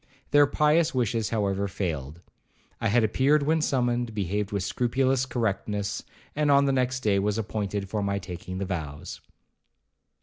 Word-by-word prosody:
Their 145 0 +6
pious 150 +2 +2
wishes, 115 -3 0
however, 100 -3 0
failed. 85 -5 -4 0.6
I 115 - 0
had 115 +2 +3
appeared 140 +7 +3
when 160 +2 +2
summoned, 120 -5 0
behaved 100 +1 -1
with 100 -2 -1
scrupulous 130 +5 +1
correctness, 105 -4 -2 0.3
and 150 0 +1
the 140 0 +6
next 130 0 0
day 100 -4 +2
was 105 +2 0
appointed 105 -2 -3
for 105 +2 -2
my 100 0 0
taking 90 -1 -7
the 100 - -2
vows. 80 -6 -5
110 Hz, 145 wpm, -26 LUFS, 100-130 Hz, 0.6 s, Their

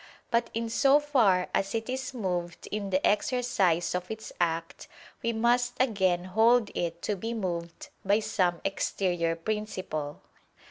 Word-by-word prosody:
But 235 0 +2
in 230 0 -1
so 275 +5 +4
far 230 -12 +3
as 195 +3 0
it 225 0 -2
is 260 +1 -3
moved 180 -7 -3
in 205 -1 -3
the 190 0 +1
exercise 205 -6 +2
of 180 0 -3
its 220 0 -7
act, 165 -1 -2 0.3
we 230 - 0
must 240 +2 +2
again 190 -8 +2
hold 220 +4 +3
it 170 0 -3
to 210 - 0
be 225 +4 -4
moved 170 -5 -4
by 200 +2 +3
some 185 -5 0
exterior 175 -3 0
principle. 185 -6 -4
200 Hz, 145 wpm, -28 LUFS, 175-230 Hz, 0.3 s, so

